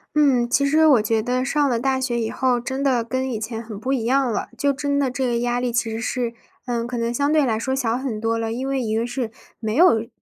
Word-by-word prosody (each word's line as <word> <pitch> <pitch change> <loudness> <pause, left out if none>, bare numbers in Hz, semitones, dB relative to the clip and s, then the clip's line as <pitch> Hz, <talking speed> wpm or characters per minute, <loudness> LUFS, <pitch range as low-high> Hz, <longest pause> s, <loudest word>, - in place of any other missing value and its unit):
嗯， 265 -5 +3
其 280 +3 +2
实 310 +3 +4
我 270 -7 +6
觉 220 +1 +1
得 250 +3 -1
上 285 +1 +1
了 235 -2 0
大 265 +1 0
学 250 -2 -1
以 225 -1 -2
后， 255 -2 +1
真 260 +3 -4
的 255 -4 +2
跟 260 +2 -2
以 225 - -3
前 225 +1 -4
很 220 -3 -8
不 260 +5 -1
一 240 -4 -1
样 260 0 +2
了。 - - -2
就 280 0 +2
真 285 +1 -1
的 275 -3 +1
这 260 0 -1
个 240 -1 0
压 245 0 0
力 245 -1 -1
其 230 -1 0
实 225 +1 -4
是， 235 0 -2 0.3
呃， 235 -2 -2
可 245 0 -4
能 230 0 -1
相 285 +4 +1
对 305 -2 +4
来 220 -3 0
说 265 +3 -1
小 240 -3 0
很 255 -5 -3
多 225 +1 0
了。 225 0 -2
因 255 +4 -3
为 270 -1 0
一 220 -2 -1
个 225 +1 0
是， 240 -1 -3 0.3
没 220 -1 -2
有， 230 -9 +4
245 Hz, 295 characters per minute, -22 LUFS, 230-270 Hz, 0.3 s, 我